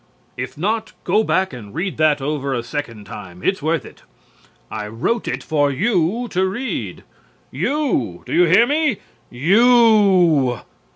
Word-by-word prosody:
If 125 +3 -6
not, 215 +5 -2
go 220 - +2
back 190 -6 0
and 105 -5 -10
read 180 +3 -3
that 155 -2 +2
over 140 -2 -2
a 120 - -3
second 120 -5 -6
time. 90 -3 -10
It's 190 - 0
worth 160 +2 -1
it. - - -14 0.7
I 105 -1 -5
wrote 120 - -2
it - - -3
for 145 -3 +1
you 190 - 0
to 190 +1 +1
read. 240 +8 -4 0.5
You, 265 - -1
do - - -6
you 175 - +5
hear 190 +8 +5
me? 295 -4 +1 0.3
You! 190 - +4
165 Hz, 150 wpm, -20 LUFS, 130-215 Hz, 0.7 s, you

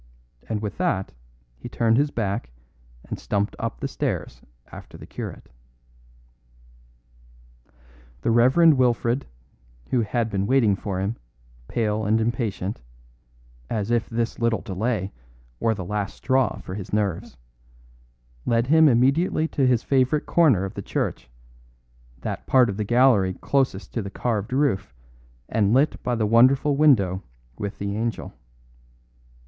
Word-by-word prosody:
And 110 -1 -2
with 105 - -5
that 110 - -1 0.5
he - - -8
turned 115 0 +2
his 145 +2 +2
back 100 - -3 0.6
and - - -6
stumped 100 0 -1
up 115 0 -4
the 140 - -2
steps 120 - -4 0.3
after - - -11
the - - -11
curate. - - -8 2.7
The - - +2
Reverend 130 +6 +5
Wilfred, 120 +1 +1 0.6
who 125 - +3
had 115 +1 -1
been 100 -1 -1
waiting 115 -6 +3
for 95 -1 -4
him, 100 +4 -2 0.5
pale 110 -2 -1
and 110 +2 +2
impatient, 110 - -2 0.9
as 110 0 -2
if 120 -1 +1
this 115 0 -2
little 115 -1 +1
delay 100 -1 -2 0.5
were 110 -1 +1
the 95 -3 -6
last 105 +1 -3
straw 130 -5 +1
for 90 - -8
his 95 -1 -7
nerves, 105 -3 -2 1.1
led 115 0 +1
him 160 +3 +5
immediately 140 +7 +2
to 135 -2 +1
his 125 -2 +2
favourite 135 +2 +1
corner 135 - +3
of 95 - -6
the - - -6
church, - - -3 0.9
that - - -5
part 125 -4 +4
of 100 - -7
the 105 - -1
gallery 115 -5 +3
closest 130 -8 -1
to 115 - -1
the 100 - -6
carved 110 0 -2
roof 120 - 0 0.5
and 105 0 +2
lit 145 +4 +2
by 125 - -1
the 110 -2 0
wonderful 130 +6 +4
window 105 -11 +3 0.4
with 100 0 -4
the 100 0 -3
angel. 115 -1 -3
115 Hz, 140 wpm, -24 LUFS, 100-130 Hz, 2.7 s, Reverend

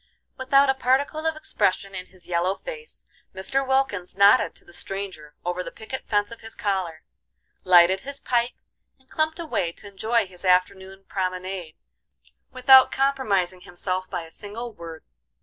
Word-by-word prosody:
Without 275 +2 +4
a 270 - +4
particle 275 +5 +1
of 320 - 0
expression 195 -9 -1
in 185 -1 -6
his 185 -2 -19
yellow 180 +2 +1
face, 465 - -10 0.3
Mr. 265 +9 +1
Wilkins 265 -10 0
nodded 200 0 +5
to - - -16
the 175 - -17
stranger 190 -8 -6
over 180 +1 -1
the - - -6
picket 255 +4 -8
fence 205 0 +1
of 230 - -10
his 225 0 -10
collar, 185 -6 -2 0.6
lighted 180 +1 +6
his 275 +5 -8
pipe, 240 -1 0 0.4
and 265 -1 -28
clumped 315 0 0
away 310 - -2
to - - -14
enjoy 220 +3 0
his 180 -1 -13
afternoon 190 +1 +1
promenade 185 -3 -4 0.8
without 260 +1 +7
compromising 205 -10 0
himself 185 +1 -4
by 170 - -3
a 165 - -13
single 225 +5 -7
word. 165 -4 -10
200 Hz, 155 wpm, -24 LUFS, 185-260 Hz, 0.8 s, without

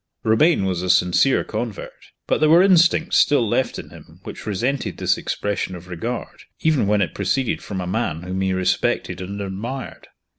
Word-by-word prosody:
Romayne 110 - +3
was 90 -2 -1
a 90 - -3
sincere 90 +10 +3
convert, 115 -5 -5 0.3
but - - 0
there 155 0 +3
were 170 +3 +7
instincts 170 -3 +4
still 140 -6 +3
left - - 0
in - - -9
him - - -15
which - - -9
resented 120 +7 -2
this - - +1
expression 100 -2 -3
of 90 +1 -11
regard, 120 - -6 0.2
even 155 -10 +2
when 105 -1 +3
it 90 - -5
proceeded 100 +6 -1
from 100 -3 -6
a 90 - -3
man 90 -4 -2
whom 95 +1 -3
he 95 0 0
respected 95 0 -1
and 100 +2 -6
admired. 105 +7 -6
105 Hz, 180 wpm, -21 LUFS, 95-135 Hz, 0.3 s, were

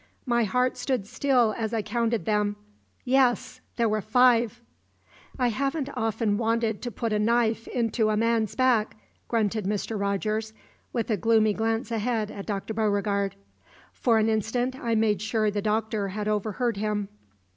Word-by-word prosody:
My 235 -3 +2
heart 250 +5 +1
stood 245 -4 -1
still 245 -1 +2
as 225 0 -2
I 220 - -1
counted 230 -5 -1
them. 210 -1 +1 0.5
Yes; 255 -1 +2
there 235 -1 +2
were 215 0 0
five! 240 +1 +3 0.8
"I 250 -2 +2
haven't 275 +4 -1
often 225 -3 0
wanted 225 -1 0
to 245 - -3
put 230 0 -3
a 210 - +1
knife 230 +1 +1
into 225 -2 0
a 215 - +1
man's 225 -1 +1
back," 245 -5 +2 0.3
grunted 215 -2 0
Mr. 210 +2 -2
Rogers, 215 +2 -1 0.4
with 235 -1 -2
a 215 - +2
gloomy 220 -2 +3
glance 225 +2 -1
ahead 220 -1 -1
at 200 - -8
Dr. 205 +1 -3
Beauregard. 200 -2 0 0.6
For 230 -3 +2
an 220 0 +3
instant 225 +4 0
I 235 -3 -1
made 215 -2 +2
sure 215 -1 0
the 205 0 -2
Doctor 215 -1 -1
had 210 +2 -4
overheard 215 +2 -1
him. 210 -1 -1
220 Hz, 155 wpm, -26 LUFS, 210-235 Hz, 0.8 s, five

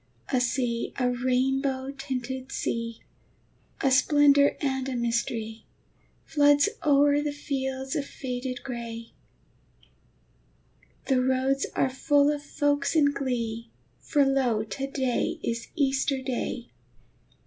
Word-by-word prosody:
A 255 - +3
sea, 240 -1 -1
a 250 -1 +1
rainbow 260 +2 0
tinted 260 -1 -5
sea, 230 -1 -3 0.8
A 270 - +2
splendor 285 +1 +5
and 265 -2 -1
a 260 - -3
mystery, 230 -2 -2 0.6
Floods 290 +2 +4
o'er 290 0 +4
the 295 0 -1
fields 265 -2 -3
of 290 - 0
faded 250 -1 -5
gray: 230 -2 -6 1.9
The 260 -2 +2
roads 260 +1 +1
are - - +3
full 285 +2 +3
of 295 -1 -3
folks 290 +1 0
in 290 -2 +5
glee, 235 -4 -3 0.3
For 290 -3 +2
lo, 255 -5 +1
to 270 +6 -4
day 260 -3 -1
is 230 0 -3
Easter 275 -2 +1
Day! 250 -2 -4
265 Hz, 115 wpm, -27 LUFS, 245-280 Hz, 1.9 s, splendor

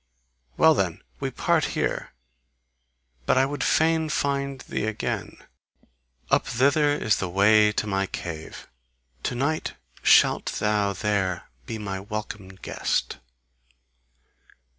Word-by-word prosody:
Well 160 0 +6
then! 95 - -1 0.2
We - - -2
part - - +1
here! - - -1 1.2
But - - +3
I 130 - +5
would 145 +1 -3
fain 160 0 +2
find 140 -2 -1
thee - - -3
again. 110 0 -3 0.9
Up - - +3
thither 145 +4 +3
is 110 -7 +1
the 95 - -3
way 105 +3 +5
to 105 - -1
my 95 -1 0
cave: 80 -4 -7 0.5
to 125 - -2
night 145 +5 -1 0.3
shalt - - +4
thou 105 -1 +1
there 95 -2 -1 0.2
be 115 - -4
my 100 -3 -4
welcome 105 0 -6
guest! 95 -7 -2
105 Hz, 120 wpm, -25 LUFS, 95-140 Hz, 1.2 s, Well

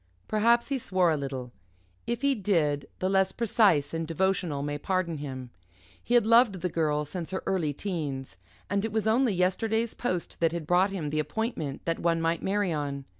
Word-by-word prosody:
Perhaps 235 +4 +3
he 275 -2 0
swore 185 -6 +2
a - - +2
little. 135 -4 -5 0.6
If 235 +1 -2
he 280 0 +4
did, 165 - 0
the 185 - -1
less 190 0 +3
precise 200 -10 +2
and 165 0 -2
devotional 170 -3 0
may 145 0 -3
pardon 185 -1 -1
him. 130 -4 -6 0.5
He 245 - +1
had 240 - +5
loved 230 -5 +4
the 180 - 0
Girl 150 -3 0
since 165 +2 -6
her 190 - -3
early 170 -6 0
teens, 145 - -4 0.3
and 200 0 0
it 225 - -2
was 220 -1 -1
only 235 +2 +3
yesterday's 220 +5 0
post 180 -8 -3
that 165 -1 +2
had 170 -2 -4
brought 180 +4 +3
him 170 -7 -4
the 155 - 0
appointment 155 - -3
that 165 -1 -1
one 165 -1 +1
might 165 0 0
marry 195 -2 0
on. 140 -2 -3
180 Hz, 190 wpm, -28 LUFS, 150-205 Hz, 0.6 s, had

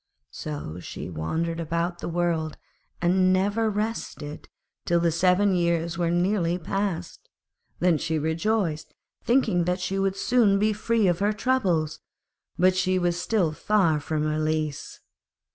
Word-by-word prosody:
So 145 - -6
she 90 - -7
wandered 165 - -2
about 170 +2 -2
the - - -4
world, 165 -2 -1 0.5
and 185 +1 +3
never 205 +4 +1
rested 210 -8 -4 0.3
till 170 0 +2
the 170 0 +2
seven 185 +4 +3
years 170 -1 0
were 170 -1 0
nearly 175 0 +1
passed. 180 -1 -4 0.5
Then 175 -3 +2
she 160 -1 -1
rejoiced, 160 +1 -1 0.3
thinking 220 -9 +2
that 180 +2 0
she 195 0 -2
would 195 0 0
soon 220 -3 +3
be 215 +2 +2
free 220 +1 +1
of 175 -2 +2
her 205 +2 +2
troubles; 195 -10 0 0.6
but 185 +1 +4
she 185 0 +1
was 175 -1 0
still 190 -8 +1
far 170 -2 +2
from 155 +1 -2
release. 155 -1 -2
175 Hz, 140 wpm, -25 LUFS, 160-200 Hz, 0.6 s, but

